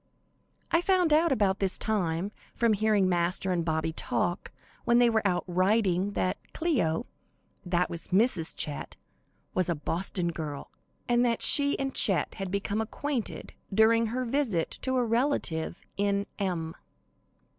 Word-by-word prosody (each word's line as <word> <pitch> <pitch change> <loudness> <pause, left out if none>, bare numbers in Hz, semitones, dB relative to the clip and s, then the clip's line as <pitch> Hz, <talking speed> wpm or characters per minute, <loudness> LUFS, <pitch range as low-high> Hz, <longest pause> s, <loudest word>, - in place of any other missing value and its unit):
I 335 - +4
found 360 -3 +2
out 320 +1 +4
about 200 -6 +2
this 195 -2 -1
time, 185 -3 -1 0.2
from 235 -2 +3
hearing 210 -2 +2
Master 180 +1 0
and 175 -2 0
Bobby 160 0 -1
talk, 175 +2 -2 0.3
when 240 -1 +3
they 240 -1 +5
were 220 -1 +2
out 175 -2 0
riding, 190 +1 +1
that 185 -2 0 0.2
"Cleo" 245 - 0 0.6
that 180 0 +1
was 170 -1 -6
Mrs. 190 -4 +1
Chet 145 -2 -3 0.6
was 185 -1 +1
a 170 - +1
Boston 170 +3 -1
girl, 150 -4 -6 0.4
and 240 0 +3
that 235 -2 +1
she 285 -1 +5
and 270 0 -2
Chet 195 -4 +2
had 195 - -3
become 200 +2 -1
acquainted 255 +2 -4 0.2
during 225 +3 +4
her 250 +3 -2
visit 230 - 0
to 260 0 -1
a 245 - +2
relative 230 - -1
in 200 0 +1
M 170 -5 -2
200 Hz, 145 wpm, -28 LUFS, 175-235 Hz, 0.6 s, they